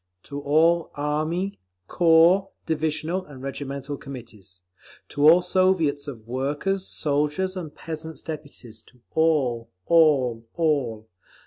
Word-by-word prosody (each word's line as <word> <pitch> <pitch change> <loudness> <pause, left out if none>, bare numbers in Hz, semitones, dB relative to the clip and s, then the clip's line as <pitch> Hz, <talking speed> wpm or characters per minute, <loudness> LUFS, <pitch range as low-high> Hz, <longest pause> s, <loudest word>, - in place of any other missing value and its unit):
To 145 0 -7
all 160 +4 +3
Army, 155 +6 -2 0.3
corps, 175 +3 +4 0.2
divisional 160 +3 -1
and 135 -5 -12
regimental 140 +1 -5
Committees, 110 -10 -11 0.5
to 145 +2 +5
all 175 +2 +6
Soviets 180 -6 +1
of 115 -6 -9
Workers', 145 +10 -2
Soldiers' 150 +6 -1
and 165 -5 -7
Peasants' 160 0 -7
Deputies, 140 -7 -8
to 125 - -22
all, 140 -8 +1 0.2
all, 140 -9 +3
all. 135 -10 0
150 Hz, 110 wpm, -24 LUFS, 135-165 Hz, 0.5 s, all